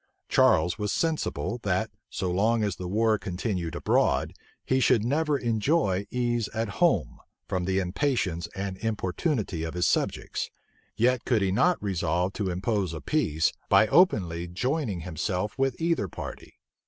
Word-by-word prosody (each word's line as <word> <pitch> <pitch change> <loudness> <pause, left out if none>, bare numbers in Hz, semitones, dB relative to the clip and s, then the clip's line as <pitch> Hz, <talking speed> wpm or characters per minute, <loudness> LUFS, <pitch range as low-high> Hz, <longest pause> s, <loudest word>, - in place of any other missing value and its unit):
Charles 85 +6 +3
was 105 -1 -1
sensible, 155 -6 -1
that, 100 +2 0 0.2
so 90 -2 -2
long 110 +5 +2
as 100 -3 -1
the 90 - -5
war 110 +2 +2
continued 90 -3 -3
abroad, - - +1 0.3
he 130 - +2
should 125 -4 +3
never 150 +3 +1
enjoy 110 - +1
ease 120 -3 0
at 110 -4 -3
home, - - +2 0.3
from 90 -1 -1
the 95 +1 0
impatience 95 - 0
and 95 -1 -4
importunity 110 - -1
of 80 +1 -4
his 90 - +1
subjects; - - -1 0.5
yet 125 +1 +2
could 115 -5 +2
he 95 - +1
not 175 - +2
resolve 90 -1 0
to 100 -2 -2
impose 95 -1 -1
a - - -5
peace 80 - +1 0.2
by 100 +3 +6
openly 90 - +3
joining 115 - -2
himself 90 +4 -2
with 135 -2 0
either 165 - +1
party. - - -9
105 Hz, 150 wpm, -27 LUFS, 90-120 Hz, 0.5 s, by